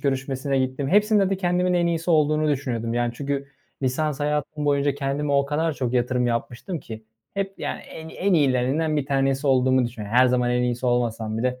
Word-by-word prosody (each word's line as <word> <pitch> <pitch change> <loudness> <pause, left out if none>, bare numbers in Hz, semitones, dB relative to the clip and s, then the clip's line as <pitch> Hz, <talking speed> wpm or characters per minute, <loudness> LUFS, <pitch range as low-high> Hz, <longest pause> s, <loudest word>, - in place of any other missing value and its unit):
görüşmesine 135 0 -1
gittim. 130 +1 -1
Hepsinde 205 0 +3
de 195 - +1
kendimin 180 -1 +1
en 175 -1 +2
iyisi 170 0 -1
olduğunu 155 -1 +3
düşünüyordum, 120 -5 -2
yani, 120 0 0
çünkü 140 +1 -3 0.3
lisans 145 +3 -1
hayatım 150 0 -2
boyunca 140 -1 +2
kendime 140 +1 -2
o 140 0 +3
kadar 160 +3 0
çok 125 -3 -3
yatırım 125 0 +1
yapmıştım 120 +8 -3
ki 110 -1 -9 0.3
hep, 195 0 -2
yani, - - -4
en 160 0 -10
en 195 +3 -1
iyilerinden 145 +2 +2
bir 140 -2 -1
tanesi 135 0 0
olduğumu 130 -1 +3
düşünüyo 110 -3 -8
Her 125 +2 +5
zaman 125 -1 +1
en 125 0 +1
iyisi 125 0 -1
olmasam 115 -3 0
bile 125 +1 -1
135 Hz, 185 wpm, -24 LUFS, 125-155 Hz, 0.3 s, Her